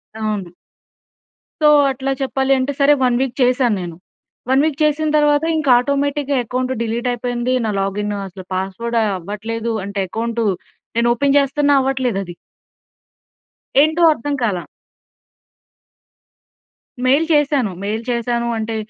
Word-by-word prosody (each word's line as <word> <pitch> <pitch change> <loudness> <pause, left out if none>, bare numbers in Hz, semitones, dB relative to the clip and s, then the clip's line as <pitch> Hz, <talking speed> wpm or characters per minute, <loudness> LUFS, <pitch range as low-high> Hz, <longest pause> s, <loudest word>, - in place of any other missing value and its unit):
అవును. 210 -5 -3 1.1
సో 305 - +5 0.2
అట్లా 270 +1 -3
చెప్పాలి 270 0 0
అంటే 265 +2 -1
సరే 285 +1 +5
1 245 -1 +3
వీక్ 265 -2 -2
చేశాన్నేను. 230 -9 +1 0.5
1 265 +1 +4
వీక్ 300 -3 -1
చేసింతర్వాత 300 0 +2
ఇంక 310 -2 -2
ఆటోమేటిక్‌గా 280 +2 0
అకౌంట్ 255 +2 -2
డిలీట్ 235 +2 -2
అయిపోయింది. 245 +1 -2
నా - - -1
లాగిన్ 205 +2 -2
అసలు 185 0 -11
పాస్‌వర్డ్ 195 +5 -3
అవ్వట్లేదు. 210 +4 -3
అంటే 200 0 -3
అకౌంటు 230 +1 -2 0.5
నేను 235 0 +3
ఓపెన్ 280 +3 +1
చేస్తున్నా 285 +1 +2
అవ్వట్లేదు 260 -5 0
అది. 175 -2 -9 1.5
ఏంటో 315 +3 0
అర్థం 290 +1 -3
కాలా. 185 -6 -1 2.4
మెయిల్ 280 +5 +3
చేశాను. 285 -8 +2
మెయిల్ 215 +3 -3
చేశాను 235 0 -1
అంటే 220 0 -3
245 Hz, 115 wpm, -19 LUFS, 220-280 Hz, 2.4 s, సో